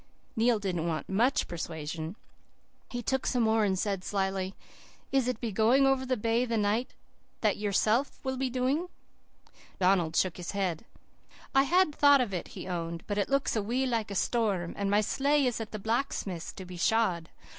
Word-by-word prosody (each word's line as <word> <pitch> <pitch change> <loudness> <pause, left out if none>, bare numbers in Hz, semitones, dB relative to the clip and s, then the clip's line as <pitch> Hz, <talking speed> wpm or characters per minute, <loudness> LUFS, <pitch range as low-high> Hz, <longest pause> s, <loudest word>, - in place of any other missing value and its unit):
"Neil 230 0 +3
didn't 180 -5 -2
want 155 -3 -2
MUCH 240 +9 +2
persuasion. 160 0 -5 0.7
He 245 -1 -4
took 265 +3 -1
some 245 -2 +2
more, 220 0 +3
and 190 -2 +1
said 195 -1 -1
slyly, 190 -1 -2 0.6
"'Is 270 -3 +2
it 250 -3 -1
going 235 +7 +4
over 265 -1 +2
the 255 -1 +1
bay 230 +3 +1
the 235 -2 -1
night 215 +4 0 0.5
that - - +2
yourself 215 +5 +1
will 265 -1 -2
be 260 0 -1
doing?' 260 +7 0 0.9
"Donald 180 -3 +2
shook 185 -3 +1
his 180 +2 -5
head. 190 -2 -2 0.7
"'I 270 - +5
had 355 0 +3
thought 285 -1 +6
of 235 -6 -1
it,' 180 - -3
he - - -6
owned, 170 -2 -4
'but 205 0 -2
it 200 - 0
looks 275 -2 +1
a 220 - +1
wee 245 +6 0
like 230 -5 -1
a 200 - -5
storm, 195 -6 0
and 200 -1 -1
my 205 +1 +4
sleigh 280 +6 +2
is 245 -2 -1
at 220 - -5
the 215 - -4
blacksmith's 210 -5 -2
to 190 - -9
be 180 0 -9
shod. 180 -4 +1
215 Hz, 185 wpm, -29 LUFS, 185-255 Hz, 0.9 s, thought